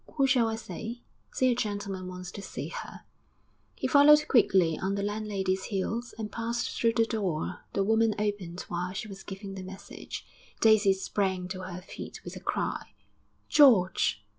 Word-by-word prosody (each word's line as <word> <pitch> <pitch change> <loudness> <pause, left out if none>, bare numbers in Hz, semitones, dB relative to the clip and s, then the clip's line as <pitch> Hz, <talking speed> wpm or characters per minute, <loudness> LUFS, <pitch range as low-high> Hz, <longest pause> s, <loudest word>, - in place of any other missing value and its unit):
Who 275 -3 +4
shall 255 -3 +4
I 225 - -1
say?' 230 +1 -7 0.3
'Say 255 -1 +2
a - - +1
gentleman 200 -4 -3
wants 180 -1 -7
to 200 - -8
see - - -6
her.' - - -7 0.7
He - - -5
followed 300 +1 +7
quickly 190 - +4
on 195 +1 -1
the 200 - -2
landlady's 200 -2 -1
heels 225 +4 -3
and 215 -2 -5
passed 235 +2 -2
through 230 -1 +2
the 230 -1 +3
door 195 -9 -2
the 195 - +1
woman 220 +1 +3
opened 205 -4 -2
while 180 +1 -4
she 215 +2 -4
was 195 -2 -9
giving 195 0 -7
the 190 - -6
message. 190 +1 -8 0.3
Daisy 215 -3 +5
sprang 190 -1 -1
to 185 - -5
her 185 -1 -6
feet - - -9
with - - -8
a - - -6
cry. - - -3 0.5
'George!' 190 - +5
205 Hz, 170 wpm, -29 LUFS, 190-230 Hz, 0.7 s, followed